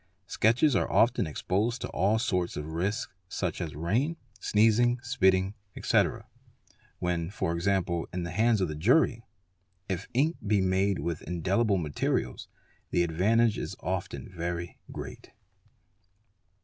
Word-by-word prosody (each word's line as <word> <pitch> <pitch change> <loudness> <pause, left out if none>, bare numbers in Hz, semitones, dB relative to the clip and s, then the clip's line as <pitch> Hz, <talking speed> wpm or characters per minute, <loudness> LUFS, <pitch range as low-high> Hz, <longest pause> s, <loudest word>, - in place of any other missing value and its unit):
Sketches 120 +8 +3
are - - +1
often 120 -6 +3
exposed 105 - -1
to - - -2
all 100 +4 +2
sorts 90 -7 -1
of 75 - -4
risks 100 +9 -2 0.2
such 90 -2 -2
as 80 -4 -4
rain 115 - 0 0.2
sneezing, 115 +3 +3
spitting, 95 -5 +2 0.2
etc., - - +1 0.7
when 85 -2 -1
e.g., 85 0 -1 0.4
in 90 -1 -3
the 85 - -4
hands 110 +3 +2
of 95 - +2
the 75 - -4
jury. 115 - +3 0.7
If 95 -3 -3
ink 155 +6 +2
be 105 -1 +3
made 95 +1 +2
with 85 -2 -3
indelibl 95 +4 +1
materials 75 -4 -2 0.4
the 85 - +2
advantage 105 +7 +2
is - - -5
often - - -4
very 85 0 -4
great. - - -8
95 Hz, 130 wpm, -29 LUFS, 85-115 Hz, 0.7 s, Sketches